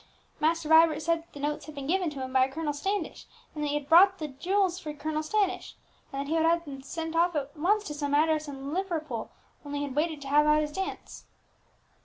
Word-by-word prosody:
"Master 325 0 +1
Vibert 320 -1 +6
said 335 0 +1
that 330 - -21
the 290 - -9
notes 295 +2 -3
had 310 - -9
been 280 -1 -6
given 360 +3 +1
to 280 -3 -6
him 260 0 -6
by 260 -1 +5
a 265 - -8
Colonel 305 0 -2
Standish; 385 +4 -3 0.3
and 300 - -4
that - - 0
he 290 - -1
had 295 -1 -3
bought 375 +4 +7
the 305 -1 -5
jewels 365 +6 0
for 305 -4 -6
Colonel 310 +1 -2
Standish; 390 +4 -1 0.4
and 275 - -4
that 280 - -3
he 310 - -1
would 325 - +2
have 325 -5 0
sent 325 +3 -5
them 330 +1 +3
off 345 -1 +1
at 285 0 -3
once 400 +7 +2
to 300 - -5
some 290 -1 -1
address 310 0 +2
in 275 0 -6
Liverpool, 320 - -3 0.3
only 290 0 -5
he 285 - -2
had 270 -2 -7
waited 310 0 0
to - - -8
have 295 +2 +4
out 300 0 +5
his 300 - -4
dance." 385 +5 -6
310 Hz, 245 wpm, -28 LUFS, 290-335 Hz, 0.4 s, bought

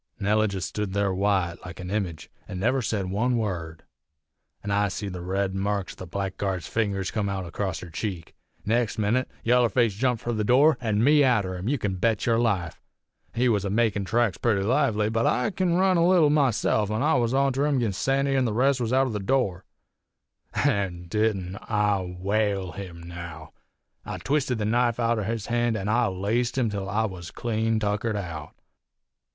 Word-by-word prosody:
Nellie 105 +2 +2
jest 95 -6 -3
stood 105 -3 -3
there 100 -1 +1
white, 95 -3 +1
like 90 0 -9
a 90 - -6
image, 95 -5 -3 0.2
an' 90 - -6
never 120 +8 +1
said 100 -5 -2
one 120 +5 +1
word; 85 -7 -4 0.8
an' 100 - -3
I 100 0 +2
seed 100 0 -4
the 90 - -6
red 95 +2 -1
marks 100 0 -2
o' - - -20
the 95 - -8
blackguard's 95 -1 -3
fingers 100 -4 -1
come 105 -3 -1
out 95 -2 -3
acrost 90 0 -3
her 90 - -9
cheek. 90 -1 -5 0.3
Next 115 +1 +1
minit 110 +4 +1
yaller 120 0 +4
face 115 -4 +2
jumped 125 +2 0
fur 120 - -1
the 110 -1 -1
door, 135 +5 +4
an' 110 -2 +1
me 145 +2 +5
arter 105 -8 +2
him, 90 +5 -3
you 145 - +1
kin 100 -5 -2
bet 110 +2 +1
yer 115 -1 +3
life! 95 -9 -1 0.5
He 125 +2 +2
was 105 -5 +2
a 100 - -2
makin' 105 -1 +1
tracks 115 +1 +1
purty 105 -5 +1
lively, 115 -3 +2
but 115 +1 +1
I 125 - +1
kin 185 -3 0
run 185 0 +3
a 170 0 +4
leetle 175 -5 +5
myself, 120 -7 +2
an' 110 +4 -1
I 155 +2 +3
was 120 -1 +1
onter 135 +1 +2
him 140 -3 +1
'gin 115 -5 0
Sandy 135 +6 +1
an' 130 -1 +2
the 110 - -1
rest 130 +3 +2
was 115 -1 -1
outer 130 0 +2
the 105 - -2
door. 100 -5 0 0.9
An' 100 -10 0
didn't 100 -3 0
I 105 -2 +2 0.2
whale 100 -1 0
him, 85 -3 -8
now? 85 -2 -8 0.5
I - - -5
twisted 135 -4 0
his 105 - -1
knife 120 +1 +1
outer 115 -3 +1
his 110 -1 -3
hand, 120 -1 0
an' 100 0 -3
I 120 +1 +3
laced 105 +7 -1
him 120 -4 +1
till 100 -1 -4
I 110 +4 +1
was 90 -5 -6
clean 115 -1 -1
tuckered 105 +1 -1
out. 85 -6 -6
105 Hz, 195 wpm, -26 LUFS, 95-120 Hz, 0.9 s, me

